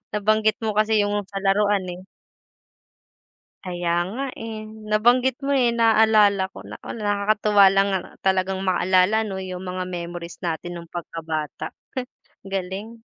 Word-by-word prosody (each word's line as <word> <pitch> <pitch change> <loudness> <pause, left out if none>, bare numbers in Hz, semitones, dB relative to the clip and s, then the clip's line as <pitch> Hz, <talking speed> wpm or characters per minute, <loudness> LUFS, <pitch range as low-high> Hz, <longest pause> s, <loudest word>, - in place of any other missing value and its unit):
nabanggit 215 +1 +2
mo 220 - +1
kasi 215 0 +3
yung 205 0 0
sa 195 -1 -5
laruan, 200 0 +2
eh. 180 +2 -10 1.6
Kaya 175 -2 -1 0.2
nga, 265 +5 -3
eh, 220 -1 -7 0.2
nabanggit 245 +4 +3
mo, 280 0 0
eh, 245 -3 +3
naalala 215 -4 +4
ko - - -11
naku - - -8
nakakatuwa 205 0 +3
lang 195 +1 +3 0.3
talagang 190 0 +1
maalala 185 +3 +3
'no 195 -3 -4
yung 185 -1 -6
mga 185 0 -4
memories 175 -1 -6
natin 175 +1 -3
nong 170 -1 -10
pagkabata, 160 -3 -5 0.2
he 255 - -1 0.4
galing. 195 +4 -5
200 Hz, 130 wpm, -23 LUFS, 185-215 Hz, 1.6 s, naalala